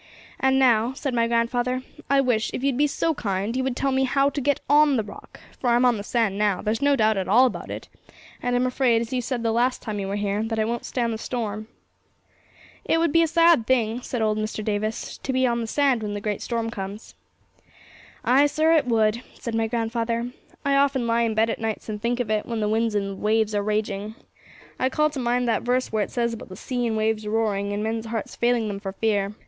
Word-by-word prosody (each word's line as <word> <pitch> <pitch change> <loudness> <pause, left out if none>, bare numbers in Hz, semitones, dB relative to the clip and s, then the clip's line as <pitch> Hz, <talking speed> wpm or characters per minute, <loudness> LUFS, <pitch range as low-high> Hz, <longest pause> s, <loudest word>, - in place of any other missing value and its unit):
'And 265 0 +3
now,' 245 -2 +3
said 270 -1 -3
my 230 -1 +2
grandfather, 245 +2 0 0.3
'I 275 0 +4
wish, 240 -4 +1
if 255 - -5
you'd 275 -2 +1
be 295 +3 +3
so 325 +3 0
kind, 205 -3 -2
you 260 - 0
would 260 -1 -1
tell 275 +1 0
me 265 0 +2
how 275 +2 +2
to 280 - -3
get 285 +1 +1
on 290 -1 +5
the 220 - 0
Rock, 205 - -12 0.2
for 245 - 0
I'm 240 +1 +4
on 245 -2 +3
the 200 - -5
sand 210 -3 0
now; 205 -3 +2
there's 220 +4 -1
no 285 0 +4
doubt 220 -4 +2
at 190 - -2
all 235 +7 +6
about 255 - -3
it, - - -6 0.5
and 245 0 0
I'm 245 +1 +2
afraid, 250 -2 +2
as 235 +2 -5
you 250 - 0
said 240 -1 -3
the 225 - +1
last 245 +3 +1
time 215 -3 -4
you 195 - -3
were 195 - -2
here, 205 0 -1
that 225 0 -2
it 215 0 +1
won't 235 0 -3
stand 235 -2 -1
the 220 - -5
storm.' 215 -3 -4 1.2
'It - - +1
would 330 -2 +2
be 330 - +4
a 330 - +3
sad 330 -6 +4
thing,' 235 -2 +1
said 245 -2 -3
old 215 0 +1
Mr. 215 0 -3
Davis, 215 +1 -3
'to 265 - -3
be 260 0 +2
on 235 -1 +1
the 225 - -3
sand 270 -1 +2
when 205 -1 -3
the - - -3
great 205 -1 -3
storm 230 -1 -2
comes.' 200 0 -7 1.1
'Ay, 275 +4 +5
sir, 310 +2 +2
it 300 -5 +3
would, 225 -1 +2
said 235 - -6
my 225 0 +1
grandfather; 230 +1 -2 0.3
'I 280 0 +3
often 275 -3 +2
lie 230 0 +2
in 225 -2 0
bed 225 +1 +2
at - - -5
nights 220 0 -3
and 210 -1 -4
think 240 +2 -1
of 230 -3 -1
it, 215 -1 0
when 230 -2 -3
the 210 - 0
winds 220 0 +1
and 200 -1 0
the 195 - -5
waves 215 +1 +1
are 205 - +1
raging. 210 0 -2 0.6
I 260 - +2
call 305 +2 +1
to 285 - -5
mind 245 0 0
that 230 - +1
verse 250 +1 0
where 215 -1 0
it - - -6
says 235 -1 -1
about 230 - -8
the 185 - -8
sea 245 +4 -2
and 225 - -1
the - - 0
waves 215 -1 0
roaring, 210 -2 0
and 205 +1 -2
men's 225 +1 -2
hearts 225 -1 -4
failing 240 -2 +1
them 200 -1 -4
for 195 -1 -6
fear. 205 -1 0
230 Hz, 250 wpm, -24 LUFS, 215-255 Hz, 1.2 s, all